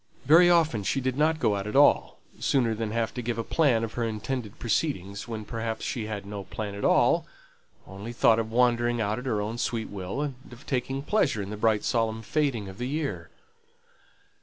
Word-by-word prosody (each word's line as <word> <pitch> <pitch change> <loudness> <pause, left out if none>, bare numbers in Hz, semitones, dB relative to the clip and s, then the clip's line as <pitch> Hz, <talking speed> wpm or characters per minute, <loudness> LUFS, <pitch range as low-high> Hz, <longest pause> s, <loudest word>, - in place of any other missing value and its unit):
Very 165 +5 +7
often 160 -10 +3
she 120 +7 0
did 130 -1 -1
not 155 +3 +2
go 105 -9 +1
out 100 +1 -3
at 105 - -5
all, 145 +1 +4 0.2
sooner 120 -5 +2
than 110 0 -3
have 115 +1 -1
to 125 - -4
give 120 -1 -3
a 115 - -1
plan 125 -5 +2
of 115 - -4
her 120 - -2
intended 110 0 -4
proceedings, 105 - -2
when 110 -2 -5
perhaps 115 0 -4
she 115 -4 -3
had 105 -2 -5
no 100 -1 -6
plan 105 +1 -5
at 100 - -6
all, - - +3 0.6
only 100 +5 -8
thought 115 -1 +4
of 110 -1 -3
wandering 120 0 +2
out 110 +1 -1
at 130 - -7
her 110 -4 0
own 110 +3 -3
sweet 115 -2 -2
will, 100 +6 -4
and 145 -2 -3 0.2
of 125 +5 -13
taking 135 0 -2
pleasure 145 - +1
in 100 - -7
the - - -4
bright 110 0 +1
solemn 115 -2 0
fading 135 -7 -1
of 95 0 -10
the 125 - -2
year. 150 +2 -3
115 Hz, 210 wpm, -27 LUFS, 105-130 Hz, 0.6 s, Very